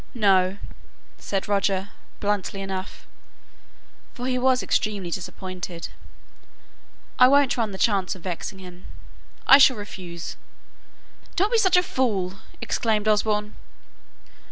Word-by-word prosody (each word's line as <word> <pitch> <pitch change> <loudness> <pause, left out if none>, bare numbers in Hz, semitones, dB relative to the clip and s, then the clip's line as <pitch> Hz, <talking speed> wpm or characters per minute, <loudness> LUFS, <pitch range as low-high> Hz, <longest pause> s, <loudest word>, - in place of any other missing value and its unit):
"No," 195 -4 +3 0.6
said 195 -1 -3
Roger, 200 -1 0 0.3
bluntly 205 -1 -1
enough 190 0 -6 1.1
for 245 - -5
he 255 -1 0
was 255 0 +2
extremely 200 -5 -1
disappointed; 180 -1 -6 1.3
"I 250 - +9
won't 280 0 +4
run 230 -3 -1
the 190 - -7
chance 195 -2 +1
of 180 - -14
vexing 185 +2 -5
him. 180 -1 -12 0.6
I 275 - +9
shall 260 -3 +6
refuse." 180 -5 -7 1.0
"Don't 395 +4 +1
be 465 - +4
such 375 -4 +4
a 360 - +4
fool!" 195 - -1 0.2
exclaimed 215 -1 0
Osborne. 210 0 +1
205 Hz, 115 wpm, -24 LUFS, 185-245 Hz, 1.3 s, I